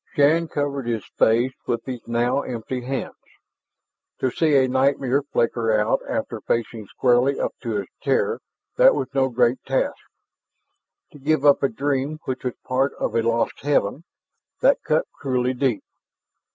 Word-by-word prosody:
Shann 160 +4 +4
covered 140 -4 -3
his 115 -4 -2
face 120 +4 +3
with 115 -1 -2
his 130 -2 -5
now 120 +3 +1
empty 125 0 -5
hands. 135 +2 -4 1.1
To 130 - 0
see 155 0 +2
a 130 -1 +5
nightmare 135 +1 +2
flicker 115 -5 0
out 105 - +1
after - - -3
facing 115 -2 -2
squarely 125 +4 +2
up - - -1
to 115 -4 -2
its 100 -2 -5
terror, 145 - 0 0.4
that - - +6
was - - -2
no 135 -1 +2
great 120 0 +2
task. 135 0 0 1.2
To 145 - -14
give 150 +1 +1
up 145 - +6
a 140 - +2
dream 140 +4 -1
which 130 0 -4
was 125 -2 -3
part 130 +2 +1
of - - -2
a 115 - +2
lost 115 0 0
heaven, 140 -1 0 0.6
that - - +4
cut - - +1
cruelly 130 -2 -1
deep. 125 -4 0
130 Hz, 155 wpm, -23 LUFS, 120-140 Hz, 1.2 s, that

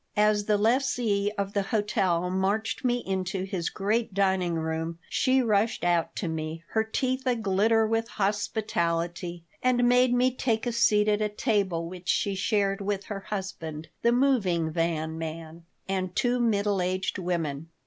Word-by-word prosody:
As 210 -1 +3
the 210 0 +2
lessee 225 -3 +1
of 200 0 -2
the 200 - +1
hotel 190 -4 0
marched 200 +6 -1
me 245 -1 +1
into 190 0 -2
his 190 -3 -2
great 215 +1 -1
dining 190 -3 +1
room 160 +1 -3
she 260 0 +2
rushed 220 0 +1
out 175 -1 +1
to 185 - -3
me, 160 0 -4
her 220 - +1
teeth 260 +4 -2
aglitter 220 -1 +2
with 225 +1 0
hospitality, 175 -5 -1 0.2
and 245 -1 +3
made 250 0 +4
me 250 +1 +3
take 230 -3 -1
a 240 - 0
seat 215 -2 +3
at 210 0 +2
a 210 - +1
table 200 -7 0
which 180 +1 -8
she 200 - +1
shared 195 0 0
with 200 0 -2
her 205 -2 -5
husband, 185 -6 -6
the 235 - +3
moving 210 -11 +2
van 160 -1 -1
man, 165 +1 -7 0.2
and 185 -1 -2
two 245 0 +1
middle 205 -4 +1
aged 185 +2 -1
women. 165 -4 -2
200 Hz, 160 wpm, -27 LUFS, 175-225 Hz, 0.2 s, made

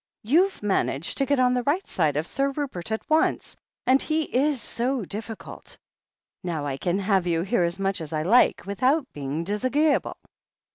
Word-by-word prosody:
You've 335 - +2
managed 170 -7 0
to 275 - +1
get 285 0 +2
on 250 -1 +4
the 250 - +1
right 295 +10 0
side 155 -5 0
of 155 - -1
Sir 275 +9 0
Rupert 270 - -4
at 220 - -3
once 315 +1 +1 0.2
— - - -46
^and 265 +2 +5
he 315 0 0
is 280 0 0
so 240 +1 -2
difficult. 220 +3 -8 0.7
Now 165 -5 -3
I 135 -2 -3
can 175 +6 -1
have 195 -2 +1
you 165 -1 +1
here 205 +2 +1
as 170 +1 -1
much 195 -2 -1
as 155 - -7
I 155 -1 -1
like, 230 +9 +4
without 255 +10 +1
his - - -51
being 145 +3 -4
disag'eeable." 255 - +1
220 Hz, 190 wpm, -25 LUFS, 175-275 Hz, 0.7 s, ^and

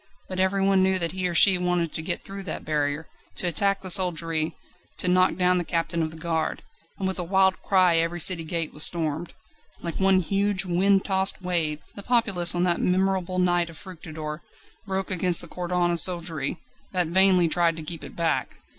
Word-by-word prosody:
But 185 0 -5
everyone 195 0 +2
knew 190 0 +2
that 170 -3 -2
he 185 0 -2
or 175 - -4
she 185 +2 +6
wanted 180 -2 -1
to - - -3
get 170 +2 -2
through 195 0 -8
that - - -6
barrier, 150 0 -2 0.3
to - - 0
attack 195 +4 +1
the 185 - +1
soldiery, 165 -4 +2 0.4
to - - -1
knock 185 -1 +3
down 180 0 +2
the - - -1
captain 165 0 -2
of 160 - -1
the 160 - -12
Guard. 160 -1 -3 0.3
And 190 - -2
with 190 0 -3
a - - -1
wild 190 +1 +2
cry 185 -3 +3
every 165 +1 0
city 170 0 +3
gate 165 0 -3
was 150 - -6
stormed. 160 0 0 0.5
Like 170 -1 -5
one 190 -1 +4
huge 195 +1 -1
wind 190 +2 +2
tossed 190 -1 0
wave, 165 -4 -1
the 200 - -9
populace 200 -8 +2
on 175 - +1
that 175 -1 +1
memorable 185 0 0
night 175 -1 +1
of 165 - -12
Fructidor, 160 -4 -8 0.5
broke 190 0 -3
against 180 -1 +2
the 170 - -8
cordon 175 0 -1
of 170 - +3
soldiery, 170 -4 -1 0.4
that 180 -1 +1
vainly 185 +1 +4
tried 170 0 +1
to 160 - -7
keep 165 +1 -7
it - - -10
back. 165 -1 -1
180 Hz, 200 wpm, -25 LUFS, 165-190 Hz, 0.5 s, she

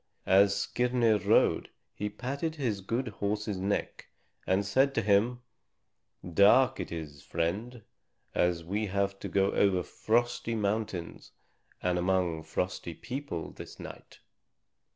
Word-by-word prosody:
As 100 +1 +5
Skirnir 120 -3 +2
rode, - - +3 0.2
he 105 - -3
patted 140 +8 -3
his 115 -9 -2
good 115 +6 -2
horse's 105 -1 -2
neck 100 +2 -2 0.4
and 95 +2 +2
said 135 +7 +2
to 115 - +1
him, 110 +5 +2 0.8
"Dark 100 +9 +5
it - - -4
is, 75 -4 -6
friend, 110 +8 -3 0.5
and 90 -1 +1
we 105 +5 -1
have 100 0 -1
to - - -5
go 100 0 +2
over 95 -3 +2
frosty 115 +2 0
mountains 105 -4 -3 0.5
and 90 -1 +1
among 90 -3 +1
frosty 85 +1 -3
people 85 - -5
this - - -11
night. - - -11
100 Hz, 125 wpm, -30 LUFS, 90-115 Hz, 0.8 s, As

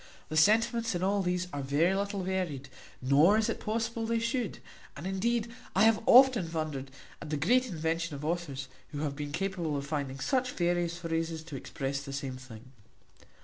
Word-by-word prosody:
The 155 - -4
sentiments 225 +5 +3
in 175 - -2
all 200 +1 +2
these 180 -1 -1
are 145 - -2
very 145 +7 +2
little 200 0 -2
varied, 175 -8 -2 0.3
nor 150 +10 +5
is 220 - +1
it - - -2
possible 225 +1 -2
they 230 0 +1
should; 230 -2 -1 0.4
and 150 - -7
indeed 230 +4 0 0.2
I 195 - +5
have 225 -1 +5
often 245 -9 +7
wondered 155 -5 -3 0.3
at 150 - -7
the 150 - -1
great 250 - +3
invention 165 -3 -2
of 140 +1 -6
authors, 155 -5 -3 0.3
who 145 - -3
have 145 -2 -2
been 145 0 -5
capable 170 -2 -2
of 140 - -4
finding 140 -2 -3
such 255 - 0
various 175 -1 0
phrases 165 -1 -2
to 160 -3 -8
express 135 +1 -4
the 140 -1 -7
same 135 -2 -4
thing. 130 -1 -12
170 Hz, 185 wpm, -30 LUFS, 145-205 Hz, 0.4 s, often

